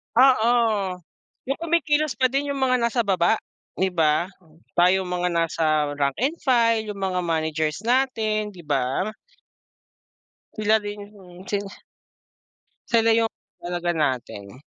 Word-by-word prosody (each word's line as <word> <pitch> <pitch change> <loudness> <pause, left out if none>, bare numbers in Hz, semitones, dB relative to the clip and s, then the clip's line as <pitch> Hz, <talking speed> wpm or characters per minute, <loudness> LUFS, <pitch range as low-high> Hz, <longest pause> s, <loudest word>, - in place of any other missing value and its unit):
Oo, 225 -7 +3 0.5
yung 275 - 0
kumikilos 310 -3 +1
pa 260 -1 +2
din 280 +2 -1
yung 275 - -4
mga 255 -1 +3
nasa 235 0 +1
baba, 190 -3 +2 0.4
di 190 0 0
ba? 165 0 +1 0.5
Tayong 180 +1 +3
mga 180 0 -1
nasa 155 -3 +1
rank 140 -1 +1
and 300 +6 0
file, 230 -4 +2
yung 200 - -10
mga 185 -1 -1
managers 160 0 -1
natin, 220 -4 0
di 180 - -12
ba? 145 +5 -1 1.4
Sila 215 0 +2
rin, 205 -1 -6 0.2
mm, 180 -1 -14
sila 200 -1 -3 1.2
Sila 225 -1 +4
yung 225 -1 +1 0.3
talaga 175 0 -2
natin. 130 -5 -3
200 Hz, 125 wpm, -23 LUFS, 170-235 Hz, 1.4 s, Sila